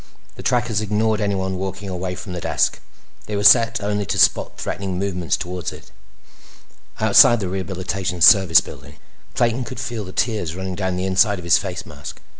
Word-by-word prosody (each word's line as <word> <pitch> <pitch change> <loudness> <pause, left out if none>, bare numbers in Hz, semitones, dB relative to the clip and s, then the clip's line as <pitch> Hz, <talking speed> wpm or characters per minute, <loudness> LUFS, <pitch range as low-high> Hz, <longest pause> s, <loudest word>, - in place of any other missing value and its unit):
The - - -11
trackers 120 -4 0
ignored 110 +1 0
anyone 95 -2 -2
walking 95 +1 -5
away 90 -1 -4
from 90 - -8
the 90 - -5
desk; - - 0 0.5
they 105 - -4
were 100 - -2
set 115 +2 +5
only 105 0 -2
to - - -2
spot - - +2
threatening 95 -2 -4
movements 90 -3 -2
toward 90 -1 -5
it. - - -14 1.1
Outside 120 - +6
the 95 - -3
Rehabilitation 95 0 -4
Service 95 0 +6
Building, 70 +3 -12 0.4
Clayton 120 +2 0
could 110 - -8
feel 120 -4 -4
the 95 - -9
tears 105 -7 -2
running 95 0 -5
down 95 0 -3
the 90 - -2
inside 95 +2 +2
of 90 - -9
his 85 - +4
face 95 -3 -6
mask. 75 -5 -10
95 Hz, 180 wpm, -20 LUFS, 90-105 Hz, 1.1 s, Outside